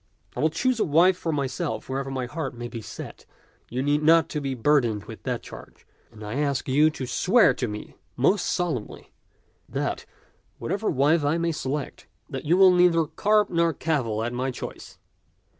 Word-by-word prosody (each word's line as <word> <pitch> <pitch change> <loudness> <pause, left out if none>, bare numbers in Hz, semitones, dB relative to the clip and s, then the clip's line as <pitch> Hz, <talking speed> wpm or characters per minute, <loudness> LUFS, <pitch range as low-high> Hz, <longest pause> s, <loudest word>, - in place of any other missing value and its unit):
I - - -5
will 155 - +3
choose 245 +9 0
a - - +3
wife 175 +5 +4
for 170 -2 -3
myself 140 +2 -3
wherever 135 +1 -3
my 130 -2 -3
heart 145 0 -5
may 120 0 -6
be 115 -1 -7
set - - -9 0.2
— - - -36
you 125 +2 -2
need 145 +1 +1
not 165 +2 +5
be 135 -2 -3
burdened 120 -5 +2
with - - -10
that - - -3
charge - - -12
— - - -36
and 110 - -12
I 105 +6 -4
ask 140 -3 -1
you 145 +4 +4
to 140 -4 -6
swear 210 - +4
to 125 - -3
me 105 0 -7 0.2
most 180 +10 +2
solemnly 165 -11 -3 0.6
that, - - -3 0.5
whatever - - -2
wife 145 +4 +2
I 145 +3 +1
may 170 0 0
select, 145 -2 -4 0.2
you 150 +6 0
will 190 -1 +7
neither 175 -2 +4
carp 210 +6 +1
nor 170 -1 +2
cavil 125 -9 -1
at 120 +1 -3
my 130 +2 -1
choice. 125 - -8
145 Hz, 185 wpm, -25 LUFS, 130-165 Hz, 0.6 s, will